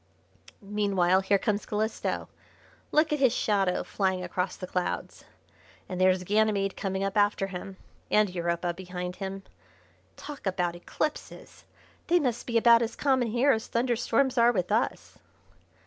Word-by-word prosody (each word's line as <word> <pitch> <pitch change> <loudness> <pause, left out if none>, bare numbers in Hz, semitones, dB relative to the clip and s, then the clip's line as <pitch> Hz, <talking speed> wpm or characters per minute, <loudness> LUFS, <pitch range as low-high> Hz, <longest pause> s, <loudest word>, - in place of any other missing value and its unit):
"Meanwhile, 195 -3 +2
here 200 +1 +3
comes 205 +1 -2
Calisto. 215 +1 -2 0.6
Look 305 0 +3
at 300 - 0
his 260 -3 +4
shadow 195 -4 +1
flying 190 -2 -1
across 180 +1 -2
the 185 - -7
clouds. 180 0 -3 0.6
And 185 0 -4
there's 185 0 +3
Ganymede 205 0 +1
coming 195 -1 -2
up 195 +1 -2
after 205 -1 +2
him, 190 0 -7 0.3
and 210 0 +4
Europa 170 0 -1
behind 180 0 -6
him. 195 0 -5 0.7
Talk 290 -8 -8
about 180 -2 -1
eclipses! 300 - -5 0.4
they 350 +1 +4
must 245 -6 -2
be 235 -1 +1
about 235 0 +6
as 230 0 -2
common 260 -4 +1
here 245 +5 +3
as 220 -3 -1
thunderstorms 245 +2 +1
are 235 +1 +6
with 185 -4 -2
us." 225 +3 -1
205 Hz, 145 wpm, -28 LUFS, 185-235 Hz, 0.7 s, about